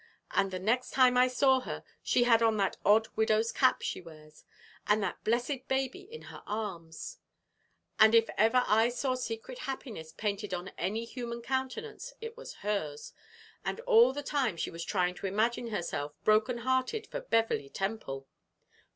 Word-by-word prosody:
And 195 Hz, -1 st, +2 dB
the 185 Hz, -, -4 dB
next 225 Hz, +7 st, 0 dB
time 255 Hz, -1 st, +5 dB
I 250 Hz, 0 st, +6 dB
saw 260 Hz, +1 st, +3 dB
her 255 Hz, -, -6 dB, 0.2 s
she 245 Hz, -, +3 dB
had 230 Hz, -2 st, +5 dB
on 225 Hz, -1 st, +3 dB
that 195 Hz, -2 st, +1 dB
odd 220 Hz, +2 st, +5 dB
widow's 220 Hz, +1 st, +2 dB
cap 255 Hz, -, +3 dB
she -, -, -3 dB
wears, 155 Hz, -2 st, -15 dB, 0.4 s
and 210 Hz, 0 st, +3 dB
that -, -, -4 dB
blessed 245 Hz, +4 st, -1 dB
baby 265 Hz, +6 st, -1 dB
in 455 Hz, +5 st, -11 dB
her -, -, -10 dB
arms; 205 Hz, -, -5 dB, 0.8 s
and 220 Hz, +1 st, +7 dB
if 225 Hz, 0 st, +5 dB
ever 225 Hz, +3 st, +4 dB
I 225 Hz, +2 st, +4 dB
saw 255 Hz, +2 st, -1 dB
secret 245 Hz, 0 st, -5 dB
happiness 220 Hz, -, -6 dB
painted 205 Hz, 0 st, -3 dB
on 180 Hz, +2 st, -6 dB
any 215 Hz, +6 st, -3 dB
human 235 Hz, -1 st, -6 dB
countenance 345 Hz, -, -3 dB
it 455 Hz, 0 st, -7 dB
was -, -, -9 dB
hers; 155 Hz, -9 st, -2 dB, 0.5 s
and -, -, -3 dB
all 475 Hz, -1 st, +6 dB
the 290 Hz, +2 st, -5 dB
time 270 Hz, -, 0 dB
she -, -, -3 dB
was 165 Hz, 0 st, -6 dB
trying 180 Hz, -1 st, 0 dB
to 195 Hz, -, -5 dB
imagine 225 Hz, +5 st, 0 dB
herself 170 Hz, -8 st, -3 dB
broken 215 Hz, +3 st, +3 dB
hearted 260 Hz, -, 0 dB
for -, -, -6 dB
Beverley 225 Hz, -, +1 dB
Temple." 195 Hz, -10 st, -4 dB
225 Hz, 170 wpm, -31 LUFS, 200-260 Hz, 0.8 s, and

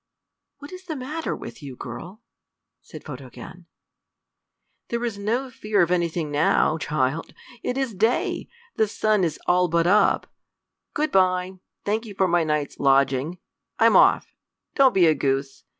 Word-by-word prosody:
"What 285 Hz, +1 st, -11 dB
is 370 Hz, 0 st, -10 dB
the 320 Hz, -3 st, -4 dB
matter 300 Hz, +5 st, -4 dB
with -, -, -10 dB
you, 135 Hz, -3 st, -8 dB
girl?" 195 Hz, -, -9 dB, 0.6 s
said -, -, -12 dB
Photogen. -, -, -10 dB, 1.2 s
"There 235 Hz, 0 st, -2 dB
is 215 Hz, -4 st, -4 dB
no 240 Hz, +6 st, -2 dB
fear 215 Hz, -4 st, +1 dB
of 170 Hz, -, -1 dB
anything 170 Hz, -3 st, -1 dB
now, 155 Hz, +2 st, +2 dB
child. 150 Hz, +1 st, -2 dB, 0.3 s
It 250 Hz, -, -3 dB
is 265 Hz, -4 st, -1 dB
day. 220 Hz, +5 st, 0 dB, 0.3 s
The 220 Hz, -, +3 dB
sun 210 Hz, -1 st, +1 dB
is 165 Hz, -3 st, -1 dB
all 180 Hz, 0 st, +3 dB
but 170 Hz, 0 st, +1 dB
up. 200 Hz, +4 st, +3 dB, 0.7 s
Good 305 Hz, 0 st, 0 dB
by. 185 Hz, 0 st, +1 dB, 0.3 s
Thank 220 Hz, +3 st, -1 dB
you 205 Hz, -, -9 dB
for 190 Hz, -1 st, +2 dB
my 175 Hz, -1 st, +2 dB
night's 150 Hz, -2 st, -2 dB
lodging. 135 Hz, +4 st, +2 dB, 0.4 s
I'm -, -, +4 dB
off. -, -, +4 dB, 0.4 s
Don't 270 Hz, -3 st, +4 dB
be 185 Hz, -3 st, +5 dB
a 160 Hz, -, +5 dB
goose. 135 Hz, -1 st, -2 dB
185 Hz, 150 wpm, -24 LUFS, 155-225 Hz, 1.2 s, be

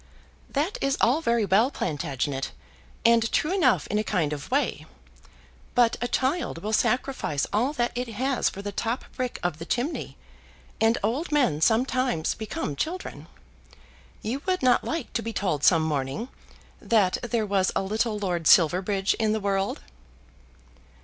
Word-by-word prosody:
"That 305 Hz, +8 st, -1 dB
is 275 Hz, 0 st, +1 dB
all 260 Hz, +7 st, +3 dB
very 235 Hz, -7 st, +2 dB
well, 205 Hz, +7 st, +4 dB
Plantagenet, 145 Hz, -, -2 dB, 0.6 s
and 230 Hz, -1 st, +4 dB
true 310 Hz, +5 st, +1 dB
enough 290 Hz, -, +3 dB
in 210 Hz, -, -1 dB
a -, -, 0 dB
kind 165 Hz, -8 st, 0 dB
of 145 Hz, -, -7 dB
way. -, -, 0 dB, 0.9 s
But 240 Hz, -2 st, +4 dB
a 245 Hz, -, 0 dB
child 260 Hz, -, -1 dB
will 215 Hz, +1 st, -2 dB
sacrifice 250 Hz, -, 0 dB
all 240 Hz, +7 st, +2 dB
that 240 Hz, -5 st, 0 dB
it 245 Hz, 0 st, -3 dB
has 255 Hz, +3 st, 0 dB
for 200 Hz, -, -8 dB
the 205 Hz, -, -4 dB
top 230 Hz, +5 st, -2 dB
brick 255 Hz, -1 st, -3 dB
of 175 Hz, -3 st, -1 dB
the -, -, -5 dB
chimney, 255 Hz, +7 st, -2 dB, 0.6 s
and 225 Hz, +1 st, +4 dB
old 265 Hz, -, -1 dB
men 255 Hz, -, +2 dB
sometimes 245 Hz, -3 st, +2 dB
become 210 Hz, -9 st, -4 dB
children. 355 Hz, -, -4 dB, 1.0 s
You 245 Hz, +6 st, -3 dB
would 370 Hz, -5 st, 0 dB
not 250 Hz, -1 st, +4 dB
like 320 Hz, -6 st, -4 dB
to 230 Hz, -, 0 dB
be 230 Hz, 0 st, -5 dB
told 160 Hz, -10 st, -1 dB
some 165 Hz, -2 st, +5 dB
morning 145 Hz, -, -2 dB, 0.5 s
that 205 Hz, -5 st, +2 dB
there 235 Hz, -2 st, -1 dB
was 195 Hz, -2 st, +1 dB
a -, -, +1 dB
little 215 Hz, +2 st, -1 dB
Lord 180 Hz, -5 st, -1 dB
Silverbridge 190 Hz, +4 st, +4 dB
in 215 Hz, -1 st, +2 dB
the 220 Hz, -, 0 dB
world." 195 Hz, -1 st, -1 dB
220 Hz, 155 wpm, -26 LUFS, 185-255 Hz, 1.0 s, some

